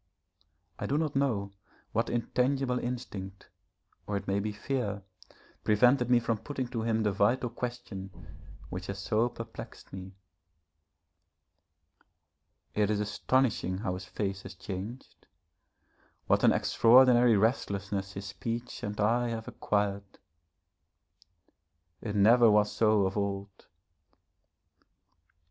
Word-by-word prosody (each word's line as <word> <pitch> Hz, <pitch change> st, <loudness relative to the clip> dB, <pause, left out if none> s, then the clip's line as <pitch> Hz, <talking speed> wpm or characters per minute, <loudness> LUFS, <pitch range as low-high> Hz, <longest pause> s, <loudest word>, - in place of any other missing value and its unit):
I -, -, -3 dB
do 140 Hz, -, +1 dB
not 155 Hz, -3 st, -1 dB
know 115 Hz, -8 st, 0 dB, 0.4 s
what 115 Hz, +2 st, 0 dB
intangible 125 Hz, +2 st, 0 dB
instinct, 100 Hz, -6 st, -6 dB, 0.6 s
or 105 Hz, -, -1 dB
it 100 Hz, -, -7 dB
may 100 Hz, +1 st, +1 dB
be 105 Hz, +1 st, -2 dB
fear, 105 Hz, -2 st, -3 dB, 0.6 s
prevented 125 Hz, +4 st, +4 dB
me 125 Hz, -1 st, +6 dB
from 115 Hz, -2 st, -1 dB
putting 130 Hz, +2 st, -4 dB
to 120 Hz, -3 st, -3 dB
him 110 Hz, -1 st, +1 dB
the 105 Hz, -, +2 dB
vital 115 Hz, +5 st, +1 dB
question 120 Hz, -6 st, -5 dB, 0.6 s
which 90 Hz, +1 st, -6 dB
has 100 Hz, -, -4 dB
so 110 Hz, +4 st, +1 dB
perplexed 115 Hz, 0 st, -10 dB
me. 95 Hz, 0 st, -8 dB, 2.6 s
It 105 Hz, -1 st, +1 dB
is 105 Hz, -1 st, +1 dB
astonishing 105 Hz, -2 st, 0 dB
how 95 Hz, -2 st, -2 dB
his 90 Hz, 0 st, -6 dB
face 100 Hz, -1 st, -3 dB
has 95 Hz, 0 st, -10 dB
changed, 100 Hz, +7 st, -8 dB, 1.0 s
what -, -, +2 dB
an -, -, +7 dB
extraordinary 120 Hz, -1 st, +5 dB
restlessness 100 Hz, -3 st, -1 dB
his 100 Hz, 0 st, -6 dB
speech 115 Hz, +4 st, -5 dB
and 105 Hz, 0 st, -5 dB
eye 120 Hz, +4 st, +2 dB
have 115 Hz, -1 st, -4 dB
acquired. 100 Hz, -1 st, -2 dB, 1.8 s
It 105 Hz, -2 st, -4 dB
never 115 Hz, +3 st, +6 dB
was 105 Hz, 0 st, +4 dB
so 110 Hz, -3 st, +3 dB
of 95 Hz, -, -2 dB
old. 100 Hz, -1 st, -4 dB
105 Hz, 120 wpm, -30 LUFS, 100-120 Hz, 2.6 s, an